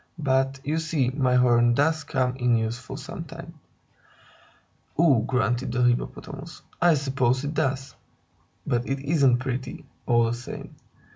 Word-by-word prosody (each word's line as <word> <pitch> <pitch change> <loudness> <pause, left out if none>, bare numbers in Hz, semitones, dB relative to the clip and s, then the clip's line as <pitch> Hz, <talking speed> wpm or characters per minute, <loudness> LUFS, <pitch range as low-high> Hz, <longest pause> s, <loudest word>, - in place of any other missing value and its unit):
But, 135 -2 +1
you 155 +2 -1
see, 155 -6 0
my 130 -2 +1
horn 120 -1 +4
does 155 +2 +2
come 130 -3 -1
in 120 -2 +2
useful 115 +2 -4
sometimes." - - -8 1.4
"Ugh!" 135 -8 +4
grunted 125 -1 0
the 125 +1 +1
Hippopotamus. 120 0 -2 0.2
"I 175 -2 +5
suppose 130 -2 0
it 145 - -3
does. 135 -2 -1 0.7
But 120 +1 -1
it 135 - 0
isn't 140 -3 +3
pretty, 130 0 -5 0.2
all 120 -1 +4
the 115 - 0
same." 120 +1 -8
130 Hz, 135 wpm, -25 LUFS, 120-140 Hz, 1.4 s, I